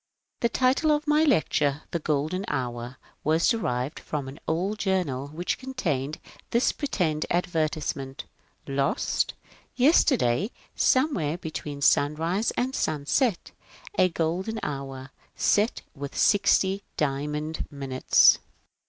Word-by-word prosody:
The 235 - +2
title 260 +6 +2
of 300 +1 +1
my 300 +1 +4
lecture, 155 - +2
" - - -41
The 170 - -1
Golden 155 +5 -1
Hour," 125 - -3 0.3
was 160 +2 +2
derived 135 - -1
from 145 -3 -4
an 135 +4 -9
old 190 +7 -1
journal 175 -10 0
which 160 +5 -3
contained 155 - -2 0.3
this 235 +2 +2
pretended 175 - -1
advertise 160 -3 0
ment: 135 +1 -7 0.3
" - - -40
Lost. 140 0 0 0.2
— - - -32
Yesterday, 245 - +3 0.3
somewhere 225 - +2
between 150 -4 -6
sunrise 165 +11 +2
and 255 +2 0
sunset, 170 - 0 0.4
a 185 - +4
Golden 180 +7 -2
Hour, 135 -2 -5 0.2
set 210 +3 +2
with 140 0 -7
sixty 200 -1 +3 0.2
diamond 150 +2 -2
minutes." 135 -3 +4
160 Hz, 120 wpm, -26 LUFS, 140-205 Hz, 0.4 s, my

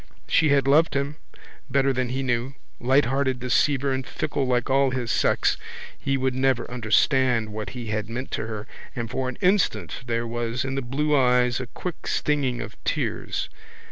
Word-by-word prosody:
She 155 - +3
had 140 -1 +3
loved 155 +2 +4
him 140 +2 -1 0.5
better 135 +1 +2
than 130 -1 -1
he 130 +2 -2
knew. 125 +1 -1 0.2
Lighthearted 130 0 +2
deceiver 135 +2 +2
and 130 0 -1
fickle 145 -1 -2
like 125 -1 +1
all 135 0 +3
his 125 -3 -2
sex - - +2 0.4
he 135 -1 -1
would 130 -1 0
never 130 -1 +1
understand 120 0 +2
what 105 0 -4
he 120 -3 -5
had 110 0 -2
meant 125 +3 -5
to 110 - -2
her 110 -1 -5 0.3
and 115 -1 -4
for 130 0 -1
an 130 - -7
instant 180 - +2
there 115 0 -1
was 120 +2 -2
in 135 - -2
the 135 - -1
blue 145 +4 0
eyes 125 -2 +3
a 130 - -5
quick 180 +7 -6
stinging 140 -5 0
of - - -9
tears. - - -2
130 Hz, 175 wpm, -25 LUFS, 120-135 Hz, 0.5 s, loved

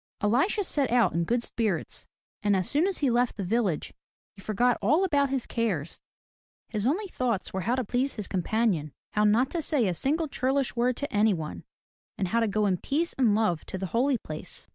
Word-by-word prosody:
Elisha 265 - +2
set 285 -7 0
out 240 -1 +3
in 170 0 0
good 240 +5 0
spirits; 210 -10 -2 0.3
and 205 -1 +2
as 185 -2 0
soon 305 +6 +2
as 390 - -1
he 275 -4 +1
left 240 +1 +1
the 200 - -2
village 195 -4 -1 0.4
he 195 - -14
forgot 230 +4 +1
all 300 - +3
about 285 -6 +2
his 265 -2 -1
cares. 195 -10 -2 0.7
His 215 0 -1
only 365 +10 0
thoughts 250 - -2
were 190 - -2
how 235 +7 +1
to 255 - -1
please 255 +5 -1
his 210 -3 -4
companion, 185 - 0 0.2
how 210 0 +2
not 230 +5 +3
to 340 - -1
say 285 -8 +2
a 180 - +1
single 310 - 0
churlish 270 -1 0
word 245 +1 +1
to 285 - -4
anyone, 180 - 0 0.5
and 190 -2 -1
how 230 - +2
to 225 - +2
go 210 +1 +1
in 190 -3 +2
peace 315 - -1
and 235 -6 +3
love 210 -7 +1
to - - -5
the 190 - -3
Holy 255 +3 +2
Place. 155 -7 -6
230 Hz, 205 wpm, -27 LUFS, 200-270 Hz, 0.7 s, out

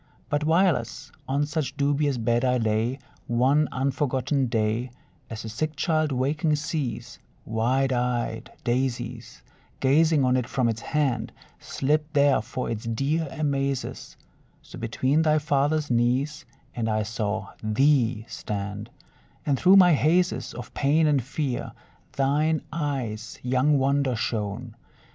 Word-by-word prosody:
But, 145 0 +1
whileas 160 - +1 0.2
on 140 +2 +1
such 150 -2 -3
dubious 145 -1 +1
bed 120 +1 +1
I 125 -1 +2
lay, 110 +2 0 0.3
One 130 +5 +3
unforgotten 135 0 0
day, 115 +2 0 0.4
As 115 0 -6
a - - -5
sick 150 +8 -3
child 155 -1 +1
waking 150 +5 +1
sees 150 -5 -4 0.3
Wide 130 +4 +1
eyed 120 -2 -2
daisies 120 -1 -2 0.4
Gazing 150 +1 +3
on 125 0 +3
it 125 -1 -2
from 130 -3 +1
its 115 0 -2
hand, 130 -7 -1 0.3
Slipped 150 +3 -1
there 140 -3 +4
for 125 +3 -5
its 115 -1 -4
dear 140 +8 0
amazes; 140 -2 -2 0.5
So - - -11
between 130 +6 +1
thy 155 -1 +3
father's 145 0 +1
knees 125 +6 +1 0.3
I 110 -2 0
saw 110 -1 -3
thee 115 0 +2
stand, 105 +1 -5 0.6
And 145 - +2
through 185 +2 +6
my 180 -3 +7
hazes 170 +3 +1
Of 120 0 -8
pain 150 +3 +2
and 145 -3 +3
fear 135 0 -3 0.4
thine 150 +3 +1
eyes' 130 -8 -3
young 130 +4 +2
wonder 135 -1 +1
shone. 110 +1 -3
130 Hz, 130 wpm, -25 LUFS, 115-150 Hz, 0.6 s, my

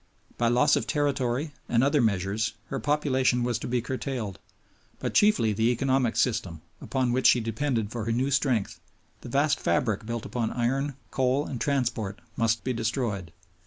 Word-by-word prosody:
By 120 - +1
loss 120 +1 +4
of - - -2
territory 145 -1 0 0.2
and 120 +1 +3
other 145 +1 +3
measures 105 0 0 0.2
her - - -2
population 130 -4 +1
was 120 -1 0
to - - -5
be 120 -1 0
curtailed; 125 -6 -4 0.6
but - - -3
chiefly 205 - +4
the 110 +3 +2
economic 130 0 +1
system, 95 -10 0 0.2
upon 130 -2 0
which 130 +2 +3
she 125 - +6
depended 115 -1 -1
for 115 -3 -4
her 115 - -1
new 130 +4 0
strength, 130 -7 0 0.4
the - - -9
vast 140 +3 +2
fabric 110 +4 0
built 115 -1 -3
upon 115 -3 -2
iron, 135 +3 0 0.2
coal, 135 +2 +1
and 125 - -5
transport 120 -7 -1 0.2
must 115 -1 +1
be 130 - -1
destroyed. 115 - -2
120 Hz, 165 wpm, -27 LUFS, 115-135 Hz, 0.6 s, she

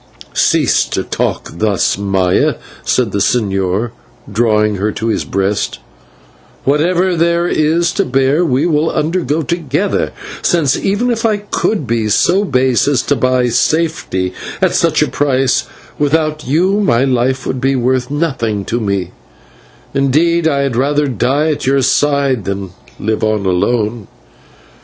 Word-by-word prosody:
"Cease - - +2
to - - -3
talk - - -3
thus, 105 -3 +1
Maya," 95 -2 +1 0.3
said 120 -5 +1
the 100 - -1
señor, 100 0 0 0.4
drawing 105 -1 +1
her 105 +3 -1
to 115 +2 -3
his - - 0
breast; 100 +1 -1 0.9
"whatever 175 +6 +1
there 170 +1 +1
is 165 +2 +1
to 200 - 0
bear 135 +2 +1
we 145 -2 +1
will 160 -1 +1
undergo 160 -1 -1
together, 170 +4 -1 0.3
since, 155 -6 +2
even 205 +6 0
if 225 -1 -2
I 220 -2 +2
could 205 -4 -2
be 115 -2 -1
so 180 - +3
base 130 - +1
as 140 -4 +2
to 145 - +1
buy 130 0 +1
safety 135 - 0 0.3
at - - +2
such - - +2
a - - 0
price, 135 -3 +1 0.3
without 155 0 0
you 180 +9 +2
my 125 - +2
life 130 0 0
would 130 - -3
be 135 0 +1
worth 125 0 0
nothing 135 -10 -2
to 120 - -2
me, 100 -5 -2 0.8
and, 140 0 +1
indeed, 165 +4 +2
I 140 -3 +1
had 135 -4 -1
rather 145 +4 +1
die 140 +5 0
at 145 - -3
your 135 0 +2
side 140 -6 +1
than 100 -1 -4 0.3
live 110 +1 -2
on 110 -2 0
alone. 105 +3 0
135 Hz, 145 wpm, -15 LUFS, 110-160 Hz, 0.9 s, so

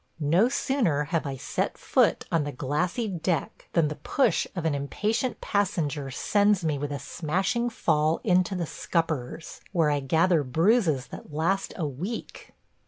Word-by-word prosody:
No 210 +8 +5
sooner 245 - +1
have 160 0 -1
I 135 - -3
set - - -2
foot - - +2
on 165 -2 +2
the 145 - -3
glassy 150 - -1
deck 175 -4 -2
than 165 -3 +3
the 150 - -5
push 245 - +2
of 175 -3 -3
an 160 - +2
impatient 210 - -1
passenger 165 -9 -1
sends 205 +6 +2
me 150 -3 0
with 145 0 -3
a 145 - -2
smashing 190 - -1
fall 155 -7 +1
into 185 -1 +2
the 175 -2 -1
scuppers, 160 -3 -3
where 165 -5 +3
I 145 - +1
gather 160 +5 +3
bruises 160 - +2
that - - -10
last 170 +6 0
a 170 - -1
week. 170 - -6
165 Hz, 160 wpm, -27 LUFS, 145-195 Hz, -, No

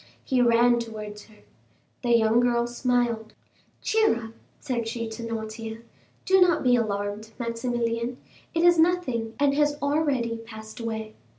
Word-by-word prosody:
He 255 -2 +1
ran 240 0 +4
towards 215 -2 -7
her. 215 -1 -21 0.6
The 240 -1 +4
young 225 +1 +3
girl 240 -1 +2
smiled. 240 -2 -1 0.5
"Cheer 440 - +3
up," - - -17 0.3
said 240 -5 -2
she 230 0 -3
to 220 +1 -7
Noirtier. 225 0 -5 0.4
"Do 380 -1 +5
not 355 -2 +4
be 250 -1 +5
alarmed, 210 -1 -2
Maximilian; 235 0 -2 0.4
it 330 - +2
is 345 -1 +6
nothing, 260 -10 +1
and 285 -1 +3
has 295 0 +2
already 285 -6 0
passed 220 -1 -10
away. 220 -2 -4
235 Hz, 140 wpm, -26 LUFS, 225-255 Hz, 0.6 s, is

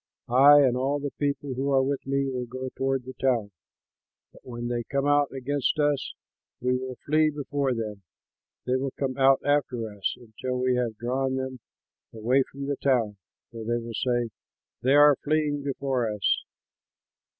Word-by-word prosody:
I 140 +4 +8
and 130 -3 +3
all 135 +3 0
the 145 -1 -4
people 140 -1 -1
who 135 +2 -2
are 135 -1 +4
with 135 0 -2
me 140 0 +1
will 125 -2 -3
go 130 +2 -5
toward 135 0 -1
the 130 +1 -8
town, 120 -6 +1 0.8
but - - -18
when 120 -1 -6
they 120 0 -1
come 140 +3 -2
out 145 -1 +3
against 135 +2 -1
us, 145 -2 0 0.4
we 125 +1 +1
will 130 0 -4
flee 155 +1 +3
before 145 -3 -2
them. 105 -3 -5 0.6
They 125 +1 +1
will 135 0 -3
come 135 -2 -2
out 135 0 +5
after 125 -7 0
us, 100 - -2
until 125 +2 -5
we 130 0 +2
have 120 -3 -1
drawn 130 +3 -1
them 130 -1 -4 0.5
away 120 +5 +2
from 140 0 -6
the 140 0 -2
town; 115 -7 +1 0.3
for 115 -1 -7
they 120 +2 0
will 115 0 -6
say, 120 0 0 0.5
'They 130 +3 +3
are 145 0 +7
fleeing 150 -1 +1
before 135 -4 -1
us.' 105 -2 0
130 Hz, 170 wpm, -26 LUFS, 120-140 Hz, 0.8 s, I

